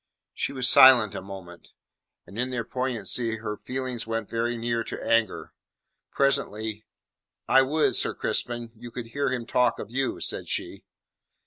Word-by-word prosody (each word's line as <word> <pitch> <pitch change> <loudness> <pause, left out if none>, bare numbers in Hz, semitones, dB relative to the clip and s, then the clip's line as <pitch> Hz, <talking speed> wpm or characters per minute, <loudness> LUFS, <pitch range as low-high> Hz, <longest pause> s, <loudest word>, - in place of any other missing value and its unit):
She - - -2
was 130 -2 0
silent 125 -6 +8
a - - -5
moment, 90 -3 -10 0.6
and 100 - -10
in 125 +1 0
their 125 -2 -2
poignancy 120 -2 -2
her 105 -1 -4
feelings 125 0 -5
went 115 -2 -3
very 115 +1 -1
near 115 0 -1
to - - -6
anger. 115 -4 +1 0.6
Presently: 110 -6 -1 0.6
"I 135 - +6
would, 150 +4 +1
Sir - - +1
Crispin, 120 -1 -2
you 120 +2 -10
could 115 -1 -7
hear 140 +4 -1
him 125 -2 -3
talk 125 0 +2
of - - -8
you," 130 +1 -1
said - - -2
she. - - -4
120 Hz, 155 wpm, -26 LUFS, 110-130 Hz, 0.6 s, silent